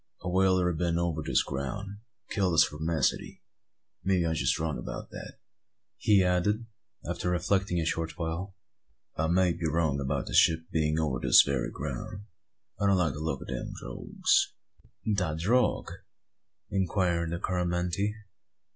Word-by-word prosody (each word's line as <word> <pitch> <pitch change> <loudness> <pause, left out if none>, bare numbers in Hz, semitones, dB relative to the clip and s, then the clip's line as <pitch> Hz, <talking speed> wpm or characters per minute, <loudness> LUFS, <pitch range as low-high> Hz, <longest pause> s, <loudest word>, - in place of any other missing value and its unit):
A - - -4
whaler 95 -1 +3
'a 90 - +1
been 85 +1 0
over 85 -2 -1
this - - +2
ground, 70 +8 -4
and 100 +1 -10 0.3
killed 95 -4 +1
the - - 0
spermacety. 80 +1 +1 0.6
Maybe 95 -3 +2
I'm 80 -1 0 0.2
wrong 80 -5 -2
about - - -7
that," - - -8 0.6
he 100 -3 +4
added, 90 +5 +1 0.4
after 90 +1 -2
reflecting 90 +1 +1
a 80 - -1
short 80 -1 -2
while. 85 +4 -4 0.6
"I 80 - 0
may 90 +1 +3
be 85 -1 -2
wrong 80 -3 +1
about 70 -1 -1
the - - -7
ship 80 0 +5
being 80 -1 +1
over 75 -6 0
this - - +7
very 70 -3 -1
ground. 75 +8 -6 0.5
I 100 - +2
don't 100 -1 +4
like 85 -4 +1
the 75 - -7
look 75 -4 -3
o' - - -11
them - - -5
drogues." - - 0 0.5
"De 90 -7 0
drogue?" 115 +10 +1 0.8
inquired 90 -3 +1
the 85 - -2
Coromantee. 90 +3 -1
85 Hz, 155 wpm, -29 LUFS, 80-95 Hz, 0.8 s, this